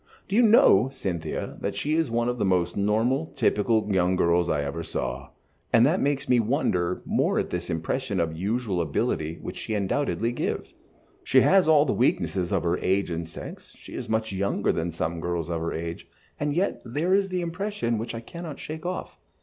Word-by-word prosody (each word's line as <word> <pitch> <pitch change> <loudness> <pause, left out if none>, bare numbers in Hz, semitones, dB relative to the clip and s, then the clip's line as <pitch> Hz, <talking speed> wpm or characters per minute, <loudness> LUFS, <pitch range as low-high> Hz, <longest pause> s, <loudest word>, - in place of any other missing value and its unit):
Do 195 - -2
you 240 - +6
know, 210 - +6
Cynthia, 90 -11 -4
that - - -2
she 150 - -1
is 160 -4 +1
one 115 +1 0
of 125 0 -2
the - - +1
most 90 -3 +1
normal, 115 +9 +1
typical 110 +1 +2
young 90 0 +2
girls 85 -1 +2
I 75 -2 +1
ever 70 +4 -4
saw, 65 -4 -4 0.4
and 115 +1 +6
that 165 +7 +2
makes 140 -1 0
me 125 - +4
wonder 100 - 0
more - - +1
at - - -1
this - - -3
impression 100 +6 -2
of 85 -1 0
unusual 100 +2 -1
ability 80 0 -1
which - - -6
she 110 - -3
undoubtedly 115 +3 0
gives. 120 - -3 0.5
She 130 - +5
has 190 +2 +5
all 155 -2 +6
the 135 - +1
weaknesses 90 - +1
of 95 -4 +1
her 85 +1 +1
age 95 -1 0
and 85 0 -3
sex, 80 - -10
she - - -12
is - - -5
much 110 -1 0
younger 100 +1 0
than 85 +1 -2
some 85 0 -3
girls 85 0 -2
of 85 -1 -2
her 85 - -2
age, 85 +1 -5 0.3
and 145 0 -1
yet 190 +4 0
there 150 +10 0
is 195 0 +3
the 180 -1 -1
impression 175 - -2
which 115 +1 -4
I 115 - -5
cannot 170 +3 -8
shake 160 +2 -6
off." 185 - -5
110 Hz, 200 wpm, -26 LUFS, 85-145 Hz, 0.5 s, you